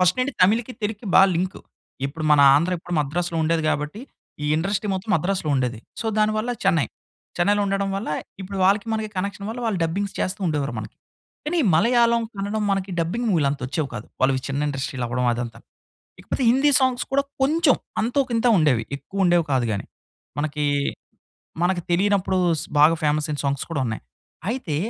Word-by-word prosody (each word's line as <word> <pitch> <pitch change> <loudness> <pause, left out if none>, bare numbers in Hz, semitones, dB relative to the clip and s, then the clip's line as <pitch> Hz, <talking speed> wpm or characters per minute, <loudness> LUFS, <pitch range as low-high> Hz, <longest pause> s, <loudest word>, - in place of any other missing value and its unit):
First 180 0 +3
నుండి 265 +3 0
తమిళ్‌కి, 225 +6 +3
తెలుగుకి 210 +1 -3
బా - - +9
లింకు. 180 +3 -2 0.5
ఇప్పుడు 155 +3 -6
మన 150 -1 +6
ఆంధ్ర 170 +6 +2
ఇప్పుడు 175 +1 -5
మద్రాసులో 170 +4 -2
ఉండేది 160 0 +1
గాబట్టి 150 +8 -2 0.4
ఈ - - 0
ఇండస్ట్రీ 195 +5 -1
మొత్తం 190 +4 -4
మద్రాసులో 180 0 -1
ఉండేది. 125 -4 -1 0.2
సో, 225 - -3
దానివల్ల 215 +2 +1
చెన్నై, 170 -7 +3 0.5
చెన్నైలో 205 +3 +2
ఉండడం 195 0 0
వల్ల 200 - -4 0.3
ఇప్పుడు 195 +1 -5
వాళ్ళకి 200 +3 +3
మనకి 220 -1 -2
కనెక్షన్ 200 +2 -3
వల్ల 240 +2 -6
వాళ్ళు 210 -5 0
డబ్బింగ్స్ 195 +5 -2
చేస్తూ 190 +3 -2
ఉండేవారు 145 -3 -1
మనకి. - - -8 0.5
కానీ, 345 +3 0 0.2
మలయాళం 235 +4 +4
కన్నడం 205 +2 -2
మనకి 195 0 -2
డబ్బింగ్స్ 225 +9 -1
మూవీ‌లు 155 -6 +2
అంత 140 0 -4
వచ్చేవి 140 +2 -2
కాదు. 105 - -6 0.2
వాళ్ళు 135 +1 +4
చిన్న 140 +1 -2
ఇండస్ట్రీ‌లు 135 -2 -3
అవ్వడం 125 +1 -1
అదంతా. 120 0 -5 0.6
ఇకపోతే 265 - -3
హిందీ 270 +4 +4
సాంగ్స్ 260 -2 +1
కూడా 275 +1 +2 0.2
కొంచెం, 305 +1 +4 0.3
అంతోకింతో 245 0 +1
ఉండేవి 145 -9 +3
ఎక్కువ 190 +8 -3
ఉండేవి 175 -2 +3
కాదు 130 -3 +2
గాని. 100 - -3 0.5
మనకి, 150 0 -1 1.0
మనకి 175 -1 +1
తెలినప్పుడు 190 +1 +2 0.2
స్ - - -5 0.2
బాగా 160 +3 +6
ఫేమస్ 150 0 +1
అయిన 145 - -3
సాంగ్స్ 140 -1 -1
కూడా 155 -4 -1
ఉన్నాయి. 110 -2 -4 0.5
అయితే, 230 - -3
185 Hz, 170 wpm, -23 LUFS, 150-215 Hz, 1.0 s, బా